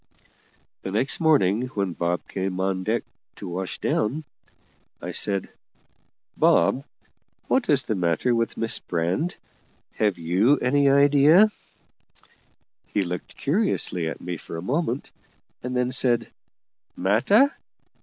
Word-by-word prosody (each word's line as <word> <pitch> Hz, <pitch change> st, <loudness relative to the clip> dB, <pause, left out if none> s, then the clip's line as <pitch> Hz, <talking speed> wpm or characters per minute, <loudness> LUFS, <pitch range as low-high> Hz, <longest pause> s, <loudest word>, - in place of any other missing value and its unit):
The 95 Hz, -, -5 dB
next 115 Hz, +7 st, 0 dB
morning, 130 Hz, -, +3 dB
when 100 Hz, -3 st, -1 dB
Bob 85 Hz, +1 st, -2 dB
came 95 Hz, -1 st, -3 dB
on 95 Hz, 0 st, 0 dB
deck 110 Hz, +4 st, 0 dB, 0.3 s
to -, -, -8 dB
wash 90 Hz, +1 st, -4 dB
down, 135 Hz, +9 st, -1 dB, 0.8 s
I -, -, -6 dB
said: 100 Hz, -2 st, -1 dB, 0.9 s
"Bob, 135 Hz, -, +3 dB, 0.6 s
what 260 Hz, -2 st, +1 dB
is 140 Hz, -3 st, +3 dB
the -, -, -2 dB
matter 90 Hz, +6 st, +1 dB
with 115 Hz, 0 st, -1 dB
Miss 115 Hz, 0 st, 0 dB
Brand? 90 Hz, -, -2 dB, 0.6 s
have 105 Hz, -3 st, 0 dB
you 95 Hz, -, +2 dB
any 140 Hz, +2 st, +2 dB
idea?" 145 Hz, +8 st, +6 dB, 1.4 s
He 100 Hz, -, 0 dB
looked 90 Hz, -1 st, -6 dB
curiously 140 Hz, -, 0 dB
at -, -, -7 dB
me 90 Hz, -1 st, -4 dB
for 80 Hz, -, -8 dB
a -, -, -5 dB
moment, 145 Hz, -5 st, -2 dB, 0.5 s
and 125 Hz, 0 st, -3 dB
then 125 Hz, 0 st, 0 dB
said: 120 Hz, -2 st, +1 dB, 0.7 s
"Matter? 200 Hz, -, +3 dB
115 Hz, 125 wpm, -24 LUFS, 95-140 Hz, 1.4 s, idea